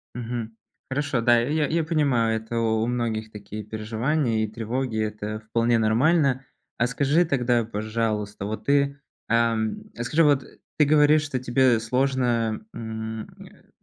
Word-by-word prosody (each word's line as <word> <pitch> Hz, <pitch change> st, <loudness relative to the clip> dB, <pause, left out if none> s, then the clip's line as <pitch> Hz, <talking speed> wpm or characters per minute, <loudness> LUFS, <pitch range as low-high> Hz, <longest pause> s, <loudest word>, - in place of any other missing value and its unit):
Мгм. 115 Hz, -2 st, -5 dB, 0.3 s
Хорошо, 135 Hz, -3 st, -1 dB
да, 120 Hz, 0 st, +5 dB
я 150 Hz, +5 st, 0 dB
я 165 Hz, +1 st, 0 dB
понимаю, 140 Hz, -8 st, +1 dB
это 115 Hz, +1 st, -5 dB
у 110 Hz, -1 st, +1 dB
у -, -, -1 dB
многих 115 Hz, -3 st, -2 dB
такие 105 Hz, +1 st, -8 dB
переживания 110 Hz, +3 st, -1 dB
и -, -, -1 dB
тревоги, 115 Hz, +2 st, -3 dB
это 105 Hz, 0 st, -4 dB
вполне 115 Hz, +2 st, +1 dB
нормально. 135 Hz, +4 st, +2 dB, 0.3 s
А 120 Hz, -, +2 dB
скажи 140 Hz, +6 st, +2 dB
тогда, 125 Hz, -5 st, +1 dB
пожалуйста, 110 Hz, -2 st, -3 dB
вот 110 Hz, +2 st, -5 dB
ты, 140 Hz, 0 st, +2 dB, 0.3 s
ам, 115 Hz, -, +1 dB
а 120 Hz, -, -3 dB
скажи 155 Hz, +7 st, +2 dB
вот 145 Hz, -3 st, +3 dB, 0.3 s
ты 150 Hz, -, +5 dB
говоришь, 150 Hz, +1 st, +5 dB
что 145 Hz, -3 st, -3 dB
тебе 125 Hz, -1 st, +3 dB
сложно, 120 Hz, -2 st, 0 dB
м, 110 Hz, -1 st, -5 dB, 0.2 s
э, -, -, -16 dB
120 Hz, 150 wpm, -25 LUFS, 110-135 Hz, 0.3 s, да